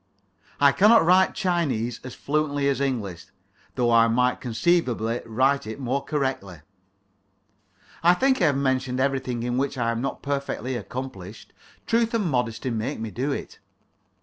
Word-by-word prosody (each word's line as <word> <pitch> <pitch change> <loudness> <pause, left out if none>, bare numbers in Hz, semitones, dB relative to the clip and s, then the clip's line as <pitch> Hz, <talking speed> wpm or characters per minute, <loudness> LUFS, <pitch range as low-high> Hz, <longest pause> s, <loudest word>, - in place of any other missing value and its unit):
I 140 -1 +6
cannot 210 +3 +5
write 185 +2 +4
Chinese 145 - -1
as 130 - -8
fluently 145 -1 -1
as 140 0 0
English, 100 -11 -3 0.5
though 120 -2 +1
I 115 0 +5
might 125 +2 +1
conceivably 120 -2 0
write 130 +3 +1
it 110 +5 -6
more 135 +1 -2
correctly. 130 - -3 1.4
I 175 +1 +5
think 260 +2 +2
I - - +5
have 145 -3 +2
mentioned 130 -2 0
everything 130 -3 -1
in 120 +1 -1
which 140 0 -2
I 115 -2 0
am 115 0 -3
not 135 - -4
perfectly 140 -2 -3
accomplished. 110 -4 -7 0.3
Truth 230 0 +1
and 215 -4 0
modesty 125 -4 -1
make 110 -1 -3
me 110 -1 -5
do 135 +6 -2
it. - - -6
130 Hz, 150 wpm, -24 LUFS, 115-145 Hz, 1.4 s, I